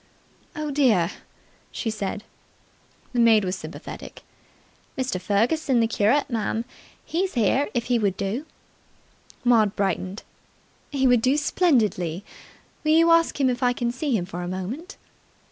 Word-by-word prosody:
"Oh, 305 -2 -3
dear!" 225 - +3 0.6
she 225 - -3
said. 210 0 -4 0.9
The 245 - 0
maid 225 -3 +5
was 185 +1 -1
sympathetic. - - -9 0.7
"Mr. 255 -9 -2
Ferguson, 245 +7 +1
the 230 - +4
curate, 225 +5 +2
miss, 225 -2 -2 0.4
he's 365 +1 -2
here, 245 +5 +2
if 235 -1 0
he 245 -1 +1
would 200 -4 0
do." 230 +11 -3 1.0
Maud 225 -4 +3
brightened. 195 0 -2 0.7
"He 270 -2 0
would 245 -3 +5
do 260 +4 +2
splendidly. 215 - +1 0.6
Will 310 0 +3
you 330 +1 +5
ask 330 -3 +3
him 270 - +3
if 250 0 -1
I 245 -1 +3
can 240 -1 -1
see 255 -1 -1
him 175 - -3
for 180 -1 -6
a 175 - -4
moment?" 215 - -5
235 Hz, 145 wpm, -24 LUFS, 200-280 Hz, 1.0 s, maid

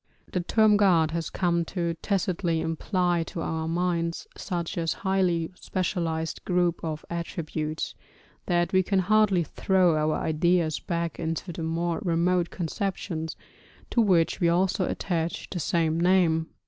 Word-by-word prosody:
The 180 - 0
term 215 +3 +4
god 170 -6 +4
has 165 0 -2
come 170 -2 +1
to 170 -1 -2
tacitly 180 -4 0
imply 175 +2 0
to 165 - -5
our 160 0 -2
minds 170 0 -1
such 170 -2 -4
a 165 -1 -2
highly 180 -2 0
specialised 170 -4 -2
group 175 -2 +1
of 155 -2 -4
attributes, 160 -2 -3 0.5
that 175 0 +1
we 185 - +5
can 195 +1 0
hardly 200 -1 +3
throw 180 +1 +2
our 155 0 +1
ideas 165 0 +1
back 170 -2 -3
into 165 +2 -3
the 165 - -6
more 165 +1 -1
remote 175 -2 +1
conceptions 175 -2 -3 0.6
to 235 - +3
which 180 -6 +3
we 170 - +3
also 185 +2 +2
attach 170 -2 -2
the 180 - -3
same 165 -1 +1
name. 170 -3 +3
170 Hz, 140 wpm, -27 LUFS, 165-185 Hz, 0.6 s, we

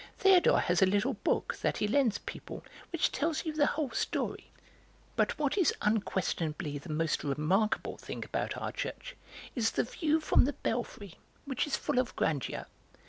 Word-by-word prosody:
Théodore 385 -2 +6
has 175 +1 +2
a 190 - +7
little 205 +8 +2
book, 210 - 0
that - - +1
he 210 - +1
lends 235 -2 +3
people, - - -8 0.3
which 335 - +1
tells 315 +4 -1
you 315 - -2
the 295 -1 +3
whole 295 -5 -1
story. 225 - -2 0.7
"But - - +1
what 300 +6 0
is 355 - +3
unquestionably 175 -7 -1
the 140 - -12
most 155 0 0
remarkable 155 +10 +1
thing - - -6
about - - -2
our - - -3
church - - -5 0.4
is 225 -3 +2
the - - 0
view 310 +5 +1
from 310 - +4
the 285 - 0
belfry, 215 -5 -4 0.3
which 275 +1 -1
is 290 - 0
full 285 -4 0
of 255 - -1
grandeur. 145 -5 -1
230 Hz, 170 wpm, -31 LUFS, 185-295 Hz, 0.7 s, a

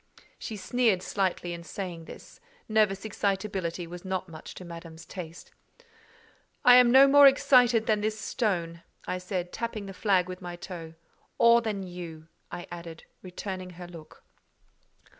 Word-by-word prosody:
She 220 - -6
sneered 220 -3 +1
slightly 185 -3 -1
in 170 - -7
saying 175 -2 -6
this: - - -12 0.3
nervous 215 -2 +2
excitability 195 -4 -2
was 175 +1 -9
not 190 -1 -3
much 160 -2 -10
to 185 - -9
Madame's 165 -1 -10
taste. 170 -2 -9 1.1
"I 245 - +9
am 250 -1 +7
no 265 +3 +8
more 285 0 +8
excited 245 -4 +5
than 215 -1 +1
this 215 +1 -2
stone," 175 -7 -2 0.2
I 185 - -3
said, 180 -1 -4
tapping 230 -3 -4
the 195 - -8
flag 185 -2 +2
with 185 0 -7
my 175 -1 -6
toe: 170 -2 -8 0.4
"or 235 0 +6
than 210 -4 -3
you," 170 -3 -9 0.2
I 175 - -6
added, 170 -2 -8 0.2
returning 185 0 -6
her 180 - -8
look. 165 -3 -13
185 Hz, 150 wpm, -28 LUFS, 175-215 Hz, 1.1 s, I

